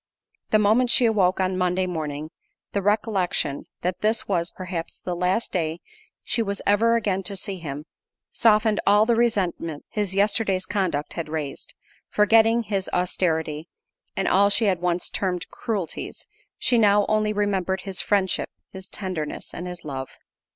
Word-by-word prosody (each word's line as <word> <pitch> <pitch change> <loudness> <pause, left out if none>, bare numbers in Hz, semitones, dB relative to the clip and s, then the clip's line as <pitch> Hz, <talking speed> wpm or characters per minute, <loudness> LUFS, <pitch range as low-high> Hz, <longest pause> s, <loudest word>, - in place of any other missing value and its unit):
The 215 - +5
moment 220 +4 +3
she 245 - +4
awoke 195 -5 +3
on 185 0 +1
Monday 180 +1 +1
morning, 155 -3 -4 0.4
the 200 - -1
recollection, 200 -8 0 0.2
that 180 +1 -2
this 220 +2 +1
was, 175 -3 0
perhaps, 180 -3 -6
the 180 - -2
last 180 +6 0
day 165 -2 -1 0.4
she 235 - 0
was 200 -2 -2
ever 225 +3 +4
again 200 -4 0
to 195 +1 -2
see 195 0 -3
him, 150 -2 -6 0.5
softened 215 -1 +3
all 205 +2 +6
the 235 - +3
resentment 190 -9 0
his 205 -3 -2
yesterday's 200 -2 +1
conduct 185 -8 -1
had 165 -2 -4
raised: 155 -3 -5 0.3
forgetting 225 +2 +4
his 200 -3 -2
austerity, 160 -3 -1 0.5
and - - 0
all 200 +2 +5
she 220 +2 +2
had 185 -4 +1
once 175 0 0
termed 180 -3 -2
cruelties, 205 -8 -4 0.3
she 245 -2 +2
now 205 -1 +5
only 215 0 +2
remembered 195 -3 0
his 190 -1 -1
friendship, 195 -2 +1 0.2
his 190 0 -7
tenderness, 180 -7 -4
and 180 - -5
his 180 -1 -7
love. 135 -2 -5
190 Hz, 155 wpm, -24 LUFS, 175-210 Hz, 0.5 s, all